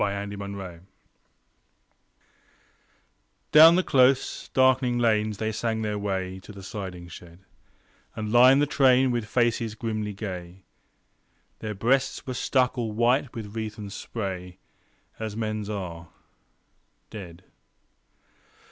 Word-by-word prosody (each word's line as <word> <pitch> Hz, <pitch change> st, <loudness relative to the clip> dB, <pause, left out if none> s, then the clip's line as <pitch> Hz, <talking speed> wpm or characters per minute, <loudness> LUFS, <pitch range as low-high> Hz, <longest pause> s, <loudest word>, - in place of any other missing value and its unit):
The 105 Hz, -, +2 dB, 0.2 s
Send 100 Hz, 0 st, -6 dB
off 90 Hz, -3 st, -8 dB, 2.7 s
Down 160 Hz, +3 st, +9 dB
the 185 Hz, -, +2 dB
close, 130 Hz, -2 st, +2 dB
darkening 130 Hz, -1 st, +3 dB
lanes 110 Hz, -3 st, +1 dB
they 110 Hz, +1 st, -2 dB
sang 110 Hz, 0 st, -2 dB
their 105 Hz, -1 st, -2 dB
way 95 Hz, -2 st, -3 dB
To 95 Hz, -, -12 dB
the 100 Hz, -1 st, -11 dB
siding 95 Hz, -3 st, -7 dB
shed, 85 Hz, +2 st, -13 dB, 0.7 s
And 105 Hz, -1 st, -4 dB
lined 130 Hz, +4 st, +6 dB
the -, -, +4 dB
train 130 Hz, -2 st, +4 dB
with 120 Hz, -3 st, -2 dB
faces 115 Hz, -2 st, 0 dB
grimly 110 Hz, -2 st, -3 dB
gay. 95 Hz, -3 st, -7 dB, 1.0 s
Their 110 Hz, -1 st, -5 dB
breasts 135 Hz, +8 st, 0 dB
were 130 Hz, -, -4 dB
stuck 130 Hz, 0 st, +1 dB
all 115 Hz, -2 st, -2 dB
white 120 Hz, +4 st, +1 dB
with 110 Hz, -2 st, -7 dB
wreath 110 Hz, -1 st, -4 dB
and 100 Hz, -2 st, -7 dB
spray 95 Hz, -5 st, -6 dB, 0.6 s
As 110 Hz, -1 st, -5 dB
men's 110 Hz, -2 st, -3 dB
are, 85 Hz, -5 st, -5 dB, 1.0 s
dead. 90 Hz, -4 st, -9 dB
110 Hz, 120 wpm, -26 LUFS, 100-120 Hz, 2.7 s, Down